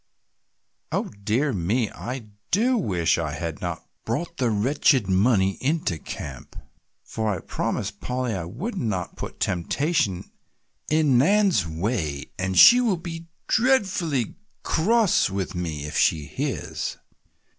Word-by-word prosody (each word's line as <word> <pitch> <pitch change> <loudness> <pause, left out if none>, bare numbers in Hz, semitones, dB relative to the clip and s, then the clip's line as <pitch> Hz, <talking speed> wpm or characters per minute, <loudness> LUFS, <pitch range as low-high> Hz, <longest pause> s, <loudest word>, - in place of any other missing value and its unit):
"Oh - - -1
dear 125 +7 +1
me, 105 +6 0
I 120 -3 -6 0.2
do 240 +7 +3
wish 90 - +1
I 80 -3 -2
had 80 +1 -5
not 85 -2 -4 0.2
brought 170 +9 -3
the 125 -3 +1
wretched 125 +1 +2
money 95 0 +2
into 140 - 0
camp, 70 -2 -8 0.5
for 110 -1 -3
I 95 - -2
promised - - -3
Polly 125 -2 -2
I 90 -4 -3
would 140 - -5
not 105 - -2
put - - -7
temptation 95 - 0 0.6
in 150 -5 +4
Nan's 190 - +3
way 80 - -3
and 95 0 -1
she 245 +1 +9
will 220 -7 +1
be 165 -1 -7 0.2
dreadfully 190 - +1 0.3
cross 215 - +3
with 95 -1 -3
me 80 -5 -4
if 75 - -6
she 75 -2 +2
hears!" - - -4
115 Hz, 130 wpm, -24 LUFS, -, 0.6 s, she